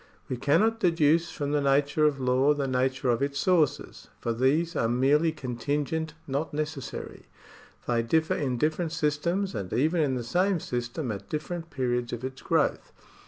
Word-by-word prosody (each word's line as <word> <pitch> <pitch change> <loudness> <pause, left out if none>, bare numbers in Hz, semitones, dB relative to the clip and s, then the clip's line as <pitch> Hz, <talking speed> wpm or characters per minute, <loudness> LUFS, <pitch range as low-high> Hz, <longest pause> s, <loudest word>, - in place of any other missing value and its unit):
We 130 - -2
cannot 165 - +2
deduce 165 -3 +3
from 145 -2 -3
the 145 0 +2
nature 140 +2 +2
of 145 -2 +2
law 130 +3 +3
the 140 -2 -1
nature 130 0 +1
of 120 - 0
its 140 0 -1
sources, 155 -5 +1
for 115 - -1
these 150 +8 +1
are 115 - +1
merely 140 +7 +3
contingent, 145 +4 -3
not 145 +2 -3
necessary; 150 -3 -5 0.6
they 120 -1 +2
differ 160 +7 +1
in 130 -4 -1
different 155 +4 0
systems 170 +5 0
and 100 -5 -5
even 160 +6 +2
in 135 -4 +1
the 125 - -3
same 180 - +1
system 120 +1 -3
at 100 - -7
different 165 +2 -4
periods 125 -4 -1
of 120 +1 -5
its 130 0 -6
growth. - - 0
145 Hz, 165 wpm, -27 LUFS, 130-160 Hz, 0.6 s, deduce